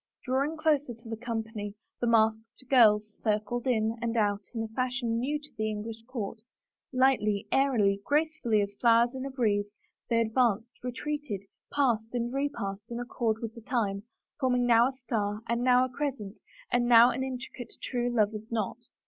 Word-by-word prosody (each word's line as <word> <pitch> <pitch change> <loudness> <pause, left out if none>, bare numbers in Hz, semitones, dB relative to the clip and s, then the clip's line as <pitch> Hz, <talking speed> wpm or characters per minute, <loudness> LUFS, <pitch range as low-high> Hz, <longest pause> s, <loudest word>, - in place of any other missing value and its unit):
Drawing 275 +5 0
closer 295 -5 +1
to 230 0 -13
the 225 - -2
company 220 -3 -4 0.2
the 240 - 0
masked 220 +1 +1
girls 215 -4 +5
cir 215 -2 +3
cled 240 +4 -4
in 225 -2 +1
and 235 0 -1
out 205 -2 +2
in 225 - -1
a - - -4
fashion 245 -1 -1
new 285 +5 0
to 295 0 -11
the 215 0 0
English 220 +1 -5
court, 225 -4 -5 0.5
lightly, 230 -6 +2
airily, 215 -8 +3
gracefully 295 -7 +1
as 200 0 -5
flowers 235 +1 +5
in 265 +1 -4
a - - -5
breeze, 215 -6 +1 0.4
they 230 -1 +3
advanced, 230 0 +1
retreated, 255 -3 -4 0.3
passed 235 -5 +1
and 240 0 -1
repassed 230 -7 -3
in 235 0 -4
accord 235 -2 -1
with 225 -1 -4
the 230 - -11
time, 210 -5 -1 0.4
forming 250 -2 +2
now 235 0 +5
a - - -2
star 220 -5 -3
and 235 +1 0
now 250 0 +5
a - - -6
crescent 250 -7 -4 0.3
and 240 0 +2
now 240 +1 +8
an 260 +2 -2
intricate 255 -1 -6
true 245 -1 -1
lover's 220 -1 0
knot. 220 -1 -1
235 Hz, 175 wpm, -29 LUFS, 220-255 Hz, 0.5 s, now